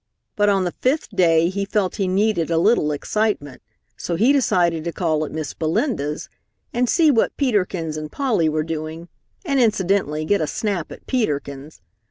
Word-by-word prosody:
But 205 0 +3
on 195 -2 +2
the 175 - -1
fifth 275 +5 +1
day 170 -2 +4
he 200 +2 -2
felt 195 -2 -1
he 195 - 0
needed 190 -3 +1
a 165 - +1
little 170 -4 +3
excitement, 150 -3 -2 0.3
so 170 - -3
he 230 +11 +4
decided 175 - +2
to 170 - -2
call 160 -3 0
at - - -8
Miss 155 -3 -4
Belinda's, 155 - -1 0.5
and 245 0 +1
see 320 -3 +4
what 230 - +1
Peter 230 -9 +2
Kins 165 -4 -5
and 155 0 -6
Polly 225 - +1
were 155 0 0
doing 160 +1 -6 0.4
and 280 -4 +1
incidentally 190 - +1
get 205 +1 +2
a 155 - 0
snap 195 -5 -3
at - - -11
Peter 220 - 0
Kins. 140 - -11
180 Hz, 185 wpm, -21 LUFS, 155-215 Hz, 0.5 s, day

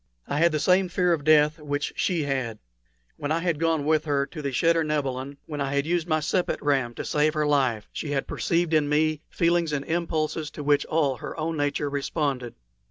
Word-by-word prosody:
I 145 - -1
had 170 +1 +4
the 155 - 0
same 180 +4 +3
fear 180 -1 +2
of 155 -3 -2
death 155 +1 +4
which 145 -1 -3
she 170 -4 0
had. 130 -6 -2 0.6
When 145 +1 -3
I 160 - +2
had 170 -4 0
gone 165 -3 +1
with 155 0 +2
her 140 -2 +1
to 155 +2 -8
the 140 - -2
cheder 165 +6 +2
nebilin, 140 -2 -2
when 150 -2 -5
I 140 0 -1
had 140 0 +1
used 170 0 0
my 155 -2 +2
sepet 175 +4 0
ram 135 -5 0
to - - -5
save 150 +1 +1
life, 140 -8 +1
she 155 - -4
had 140 -2 -1
perceived 170 -1 0
in 150 -2 +3
me 155 0 +1
feelings 170 -1 +1
and 140 -1 -2
impulses 160 -2 -1
to 150 - -6
which 145 0 +2
all 145 -5 +1
her 160 - -7
own 160 +1 -1
nature 145 0 -1
responded. 140 -3 -2
150 Hz, 210 wpm, -25 LUFS, 140-165 Hz, 0.6 s, had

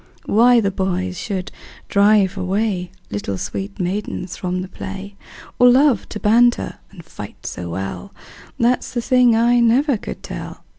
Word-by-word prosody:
Why 240 +3 +5
the 200 -3 0
boys 185 -1 -2
should 190 -3 -4 0.4
drive 200 -1 +3
away 190 -1 -1 0.2
Little 100 -1 -3
sweet 100 +1 -5
maidens 185 -1 -3
from 180 0 -3
the - - -7
play, 195 +2 -8 0.4
Or 245 0 +7
love 260 -2 +3
to 210 - -6
banter 240 +3 +2
and 175 -5 -14
fight 105 -10 -10
so 90 -1 -5
well, 95 +1 -5 0.5
That 240 +2 +2
's - - -9
the 240 - -1
thing 250 -2 +4
I 240 +2 +4
never 245 +3 +3
could - - -8
tell. - - -8
200 Hz, 155 wpm, -20 LUFS, 180-235 Hz, 0.5 s, Or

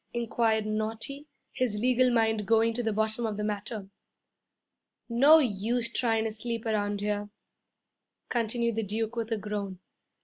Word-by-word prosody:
inquired 230 -2 +1
Naughty, 225 +7 -4 0.3
his 250 -5 0
legal 250 +2 +3
mind 220 -3 +1
going 225 +1 +4
to 245 - -2
the 225 -2 0
bottom 220 +2 -1
of 215 -2 -2
the 210 - -2
matter. 210 0 -4 1.2
'No 275 +7 +7
use 235 -2 0
tryin' 225 -3 +1
to 220 - -1
sleep 230 +1 -3
around 205 -2 0
here,' 205 0 -2 1.0
continued 235 -1 -1
the - - +2
Duke 220 +3 -3
with 230 -1 -3
a 225 - +1
groan. 205 -2 -4
225 Hz, 145 wpm, -29 LUFS, 210-235 Hz, 1.2 s, No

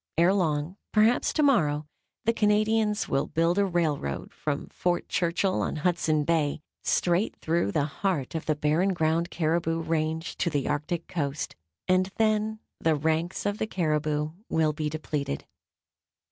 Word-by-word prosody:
Ere 170 +3 +5
long, 165 -1 0
perhaps 220 +3 +3
to 305 - +1
morrow, 155 - +3 0.4
the 230 - +3
Canadians 215 0 +2
will 135 - 0
build 165 +3 +1
a 200 - +4
railroad 155 - -1
from - - -3
Fort 175 -1 -1
Churchill, 180 +2 +1
on - - -1
Hudson 155 -2 +1
Bay, 155 -2 +1 0.2
straight 175 +4 +1
through 160 -11 0
the 145 - +1
heart 150 -2 -2
of 160 - -4
the 155 - +2
Barren 155 +6 +2
Ground 165 +1 +1
caribou 165 0 0
range 160 0 -2
to 170 - +1
the 145 -4 -1
Arctic 150 +3 -2
coast, 145 -3 -3 0.3
and 185 +1 +3
then 215 0 +1 0.2
the 160 -1 +2
ranks 160 +5 -1
of 205 +1 -1
the 220 - -1
caribou 155 -4 0 0.2
will 155 -1 +2
be 150 0 -2
depleted. 150 - -3
165 Hz, 150 wpm, -27 LUFS, 150-190 Hz, 0.4 s, Ere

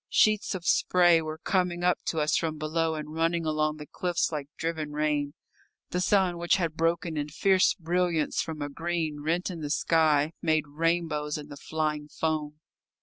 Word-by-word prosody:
Sheets 215 -2 +3
of 175 -2 -6
spray 175 -2 +4
were 155 0 -5
coming 175 0 0
up 180 0 +3
to 160 - -1
us 150 0 +2
from 160 -2 -1
below 160 +1 -1
and 150 0 -6
running 165 +1 0
along 155 0 0
the 150 - -8
cliffs 175 +2 -1
like 150 -3 -4
driven 160 -2 -3
rain. 150 -1 0 0.6
The 180 - 0
sun, 185 -2 +2
which 175 0 +3
had 170 -4 -1
broken 165 0 0
in 145 0 -2
fierce 190 +5 +3
brilliance 175 -2 0
from 155 -2 -5
a 145 - -4
green 160 -1 -3
rent 170 +5 -1
in 170 -3 -7
the 150 - -4
sky, 155 -1 +2
made 155 -2 +2
rainbows 155 -1 -1
in 150 - -9
the - - -8
flying 150 -1 -2
foam. 150 -1 -2
160 Hz, 180 wpm, -28 LUFS, 150-175 Hz, 0.6 s, spray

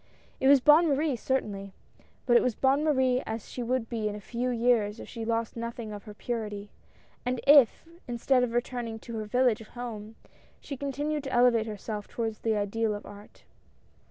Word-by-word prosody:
It 265 - +2
was 280 0 +8
Bonne 300 +5 +6
Marie 290 -1 +1
certainly, 205 -6 -2 0.5
but 240 - +3
it - - +7
was 250 -4 0
Bonne 275 +2 +2
Marie 260 -4 +2
as 220 -1 -5
she 250 - -6
would 245 0 -1
be 225 -3 -2
in 205 - -5
a - - -6
few 240 +4 -3
years 230 -3 +1
if - - -9
she 230 -2 -6
lost 230 0 -1
nothing 235 -2 -5
of 205 +1 -9
her 210 -1 -10
purity, 210 -3 -4 0.5
and 250 0 -1
if, 285 +1 +6 0.2
instead 250 +2 +2
of 245 -2 0
returning 240 -2 -2
to 230 +1 -8
her 215 - -3
village 245 0 +2
home, 220 -2 -8 0.4
she 280 - -7
continued 285 +2 -3
to 270 - -4
elevate 240 -3 +4
herself 210 0 -5
toward 225 -2 -3
the 220 -2 +1
ideal 210 +1 -1
of 205 - -8
art. 205 0 -13
235 Hz, 185 wpm, -28 LUFS, 215-255 Hz, 0.5 s, was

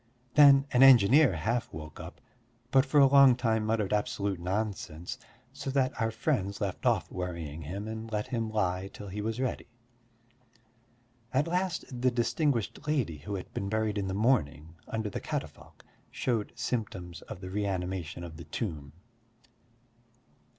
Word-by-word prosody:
Then 140 -2 +7
an 125 - +3
engineer 130 - +7
half 115 +10 -1
woke 75 -1 -9
up, - - -9 0.5
but 135 +1 +4
for 145 +2 +4
a 140 - +8
long 135 -2 +7
time 110 -3 0
muttered 110 -3 0
absolute 100 -2 -1
nonsense, 90 -3 -3 0.3
so 135 - -5
that 130 -2 0
our 115 - +2
friends 110 -4 -1
left 100 -3 -2
off - - +1
worrying 85 -4 -5
him 95 +8 -5
and 110 0 -6
let 105 -1 -1
him 115 -3 -2
lie 95 -3 -1
till 100 - -9
he 105 +3 -4
was 110 +2 -3
ready. 130 -1 -2 1.6
At 135 +3 +2
last 180 +1 -1 0.2
the 130 - +4
distinguished 125 - -1
lady 120 - 0
who 100 +8 -5
had 95 - -7
been 100 - -3
buried 110 -1 0
in 95 - -2
the 95 - -3
morning 80 - +1
under 110 -2 -3
the - - -4
catafalque - - -6 0.2
showed 115 -5 -2
symptoms 95 -7 -4
of 105 - -9
the 95 -1 -8
reanimation 95 -4 -3
of 80 -2 -8
the 85 - -9
tomb. 75 -4 -5
105 Hz, 155 wpm, -29 LUFS, 90-125 Hz, 1.6 s, a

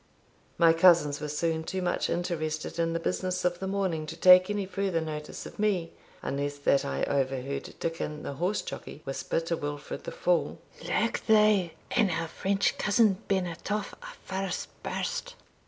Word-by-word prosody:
My 165 -1 +6
cousins 165 -4 +5
were 150 - -3
soon 160 +2 -1
too 190 +3 -3
much 175 - 0
interested 155 -2 -2
in 165 0 +1
the 165 - 0
business 185 +1 -1
of 175 0 +1
the 190 - -3
morning 190 -6 -1
to 165 - -6
take 185 +2 +8
any 205 -1 -1
further 195 -2 -1
notice 155 -1 -5
of - - -11
me, 195 -6 +1 0.3
unless 145 +1 -2
that 140 -1 +2
I 70 0 -2
overheard 135 0 -1
Dickon 155 -2 -3
the - - -4
horse 180 +8 -1
jockey - - -8
whisper 135 +4 -1
to 170 +1 -1
Wilfred 145 -1 -5
the - - -4
fool 175 -1 +1 0.3
"Look - - 0
thou, 210 -5 +5 0.2
an 205 - +3
our 165 -1 -1
French 195 +4 0
cousin 210 -2 +3
be 195 -1 +2
nat 175 +2 -6
off 210 -1 -2
a' - - -9
first 190 -1 -3
burst." - - -3
170 Hz, 170 wpm, -28 LUFS, 155-190 Hz, 0.3 s, take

